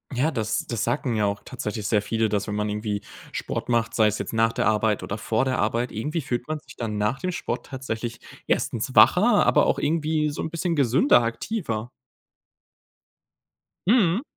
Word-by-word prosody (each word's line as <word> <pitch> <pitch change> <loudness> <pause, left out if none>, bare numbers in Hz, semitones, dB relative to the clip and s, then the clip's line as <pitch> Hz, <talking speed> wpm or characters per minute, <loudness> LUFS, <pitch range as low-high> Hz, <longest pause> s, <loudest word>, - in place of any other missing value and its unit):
Ja, 140 +6 +2
das 110 -4 -1
das 115 -3 -2
sagen 120 0 -1
ja 105 -1 +2
auch 100 0 -3
tatsächlich 105 -1 -5
sehr 105 -2 +2
viele, 110 +1 0
dass 105 0 -1
wenn 105 - -3
man 105 0 -1
irgendwie 105 0 -2 0.3
Sport - - -4
macht, 115 -1 +1
sei 110 -2 +4
es 105 - 0
jetzt - - -5
nach 115 0 +3
der - - -1
Arbeit 110 -1 +1
oder 100 - -4
vor 110 +4 0
der 130 -1 0
Arbeit, 115 +3 0
irgendwie 150 +9 -2
fühlt 125 -1 -3
man 155 0 -2
sich - - -15
dann 110 -3 -3
nach 105 +6 0
dem 185 - -2
Sport - - -4
tatsächlich 120 -3 -5 0.3
1. - - -1
wacher, - - +6
aber - - +4
auch - - +2
irgendwie 155 0 0
so - - -5
'n 160 - -3
bisschen 170 +1 -1
gesünder, 135 -2 +4
aktiver. 115 - -3 2.0
Mhm. 210 -2 +4
115 Hz, 190 wpm, -25 LUFS, 110-145 Hz, 2.0 s, wacher